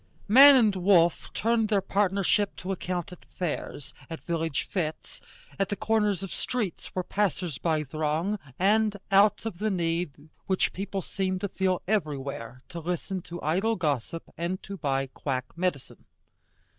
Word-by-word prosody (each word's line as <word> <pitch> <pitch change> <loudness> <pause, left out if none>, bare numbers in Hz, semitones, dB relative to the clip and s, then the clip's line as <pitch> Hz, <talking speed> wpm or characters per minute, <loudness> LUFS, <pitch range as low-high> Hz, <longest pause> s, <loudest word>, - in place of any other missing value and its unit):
Man 275 +6 +9
and 220 -6 +4
wolf 175 -2 +3
turned 225 -1 +1
their 205 -2 +3
partnership 200 +1 +1
to 190 - -5
account 180 -1 -3
at 180 - -12
fairs, 150 -5 -5 0.2
at 165 - -7
village 165 -4 -1
fêtes, 165 -6 -4 0.4
at 195 - +1
the 205 - -1
corners 210 -3 +1
of 195 - -5
streets 215 -9 -3
where 185 - 0
passers 180 -6 -1
by 160 -3 +1
throng, 155 +7 -1 0.2
and 210 +2 +3
out 200 +3 +4
of 200 -6 -4
the 215 +1 0
need 165 -4 -2 0.2
which 190 -1 +1
people 195 0 -4
seem 190 -1 -2
to 200 - -2
feel 185 -1 -1
everywhere 140 - -2
to 170 - -6
listen 180 +3 -3
to 170 +1 -8
idle 190 +9 +1
gossip 150 - -2 0.2
and 175 +2 -2
to 200 - -6
buy 135 -5 0
quack 130 -1 -3
medicine. 170 -6 -3
185 Hz, 155 wpm, -27 LUFS, 160-200 Hz, 0.4 s, Man